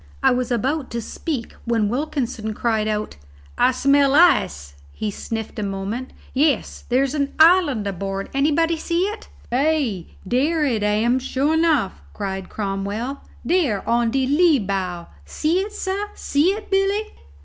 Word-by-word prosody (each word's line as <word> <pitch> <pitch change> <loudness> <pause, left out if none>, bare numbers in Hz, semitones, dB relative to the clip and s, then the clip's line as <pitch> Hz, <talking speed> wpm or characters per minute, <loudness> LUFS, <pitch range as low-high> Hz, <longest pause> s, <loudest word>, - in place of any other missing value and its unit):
I - - +6
was 250 0 0
about 260 +4 -1
to 235 - -1
speak 255 +2 -4
when 230 -3 +1
Wilkinson 245 -4 -2
cried 220 -2 0
out, 210 - -3 0.4
"I - - +4
smell 275 +1 +3
ice." 70 - +3 0.2
He 215 -1 -3
sniffed 220 +2 -5
a - - -2
moment: 200 +6 -4 0.2
"Yes, 285 +1 0
there's 265 +2 +2
an 280 -2 -1
island 315 - +5
aboard. 195 0 -3
Anybody 310 +4 +2
see 335 +2 -1
it?" 415 +4 -3 0.2
"Ay, 260 - +1 0.2
dere 300 - +1
it 235 -6 0
am, 215 +5 +2
sure 270 +4 0
enough!" 315 - +1
cried 190 -2 -4
Cromwell. 205 +6 -3 0.2
"Dere 300 - +1
on 235 0 +2
de 265 +2 +1
lee 305 +3 +4
bow 190 -5 -3 0.2
see 310 - 0
it, 400 +2 -3
sah? 405 0 -3
See 290 +4 +1
it, 415 +2 -4
Billy?" 390 +2 +2
255 Hz, 150 wpm, -22 LUFS, 210-315 Hz, 0.4 s, I